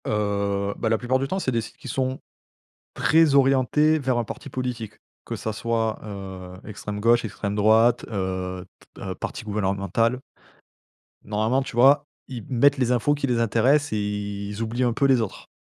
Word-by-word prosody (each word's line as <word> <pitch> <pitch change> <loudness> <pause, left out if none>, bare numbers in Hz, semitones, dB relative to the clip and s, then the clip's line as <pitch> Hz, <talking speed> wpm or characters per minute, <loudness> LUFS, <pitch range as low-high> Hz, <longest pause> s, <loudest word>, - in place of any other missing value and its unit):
Heu, 100 -1 0
bah, 115 - -1
la 110 - +2
plupart 125 +3 0
du 135 - -1
temps 190 - -2
c'est 130 - -1
des 115 -2 0
sites 115 +2 -11
qui - - -11
sont 130 +1 -2 0.7
très 160 -2 +4
orientés 140 +3 +4
vers 130 -3 0
un 120 - +1
parti 140 - -8
politique, 125 -4 -4 0.3
que - - -4
ça 110 - -4
soit, 115 0 -1
heu, 95 -3 -8
extrême 105 -1 -6
gauche, 120 +2 +4
extrême 100 -1 -4
droite, 110 +3 +4
heu, 95 -2 -3 0.3
t - - -12
heu, 95 -1 -4
parti - - -6
gouvernemental 105 +3 0 1.0
normalement 110 +5 0
tu 130 - -7
vois, 140 +4 +5 0.2
ils 130 -3 -6
m 110 - -12
mettent 140 +3 +4
les 125 -2 +1
infos 125 +4 +2
qui 145 -1 -2
les 120 -2 +1
intéressent 125 +5 +2
et - - 0
ils 105 0 -4
oublient 115 +3 -1
un 120 -2 +2
peu 140 - +1
les 130 -3 +4
autres. 110 - -6
115 Hz, 185 wpm, -24 LUFS, 105-130 Hz, 1.0 s, vois